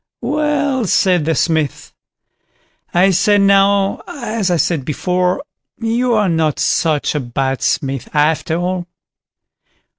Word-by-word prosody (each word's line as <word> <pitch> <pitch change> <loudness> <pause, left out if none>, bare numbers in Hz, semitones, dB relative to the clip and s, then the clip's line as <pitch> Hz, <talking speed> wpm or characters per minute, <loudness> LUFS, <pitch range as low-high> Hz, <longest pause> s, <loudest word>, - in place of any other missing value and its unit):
"Well", 285 -2 0
said 180 -4 +2
the 165 0 0
Smith, 160 -4 -1 1.0
"I 185 +3 +3
say 205 +3 +3
now, 200 0 +3
as 225 -7 -3
I 175 - +2
said 160 -1 0
before, 180 - -1 0.3
you 235 +2 0
are 210 -2 +2
not 160 -3 0
such 155 -3 0
a 150 - -1
bad 135 +1 -2
smith 135 -4 -2
after 155 +1 +1
all. 180 0 -3
180 Hz, 120 wpm, -17 LUFS, 155-210 Hz, 1.0 s, I